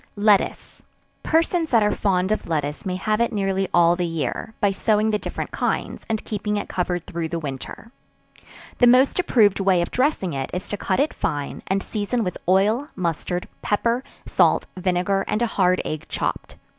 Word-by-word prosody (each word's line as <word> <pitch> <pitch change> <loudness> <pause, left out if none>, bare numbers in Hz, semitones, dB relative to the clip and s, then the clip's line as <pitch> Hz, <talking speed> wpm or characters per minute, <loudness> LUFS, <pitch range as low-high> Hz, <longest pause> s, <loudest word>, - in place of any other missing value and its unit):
Lettuce. 205 -1 +1 0.4
Persons 330 +1 +1
that 230 -3 +4
are 210 - +2
fond 190 -1 0
of 215 - -1
lettuce 150 +3 -2
may 180 - -1
have 215 +4 0
it 235 - +2
nearly 195 -2 0
all 170 0 +5
the 180 - -2
year, 165 - -3
by 205 -2 +3
sowing 215 +2 +1
the 210 - 0
different - - -5
kinds, - - -2
and 220 -1 -2
keeping 210 0 -2
it - - -3
covered 180 -1 -2
through 165 -1 -3
the 170 +1 -3
winter; 150 - -7 0.9
the 245 - +6
most 255 +7 +5
approved 220 - +3
way 190 -2 +3
of 175 - -1
dressing 255 - 0
it 135 -1 -3
is 180 - -4
to - - -2
cut 190 -2 -1
it 290 +3 +1
fine, 145 -1 -3
and 195 +1 0
season 220 +2 -2
with 180 -3 -4
oil, 210 +9 +3
mustard, 175 0 -2
pepper, 235 +4 0 0.2
salt, - - +3
vinegar, 185 +1 0
and 210 +3 0
a 235 - -2
hard 185 -1 +3
egg 155 0 -4
chopped. - - -3
195 Hz, 180 wpm, -23 LUFS, 180-220 Hz, 0.9 s, the